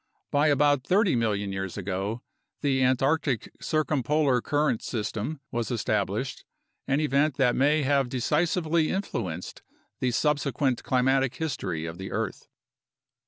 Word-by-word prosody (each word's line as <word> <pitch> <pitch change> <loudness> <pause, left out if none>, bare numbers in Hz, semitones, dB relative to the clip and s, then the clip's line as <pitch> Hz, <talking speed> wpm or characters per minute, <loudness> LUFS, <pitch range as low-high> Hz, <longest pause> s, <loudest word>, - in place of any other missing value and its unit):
By 145 +2 +3
about 145 -2 +3
30 190 - +3
million 105 -4 0
years 95 -1 -4
ago, 100 +4 -3 0.4
the 135 -2 +1
Antarctic 135 +1 +1
circumpolar 150 -3 +1
current 145 -4 +1
system 115 +5 -3
was 120 -2 -2
established, 115 -5 -1 0.4
an 135 +1 +2
event 145 -1 +1
that 130 -3 +3
may 145 +3 +3
have 135 -2 +2
decisively 160 +5 +1
influenced 90 - -4 0.4
the 130 - +1
sub 150 +4 +2
sequent 135 -3 -1
climatic 130 0 +2
history 95 - -3
of 85 +1 -7
the 95 - -6
earth. 110 0 -3
130 Hz, 125 wpm, -27 LUFS, 115-150 Hz, 0.4 s, By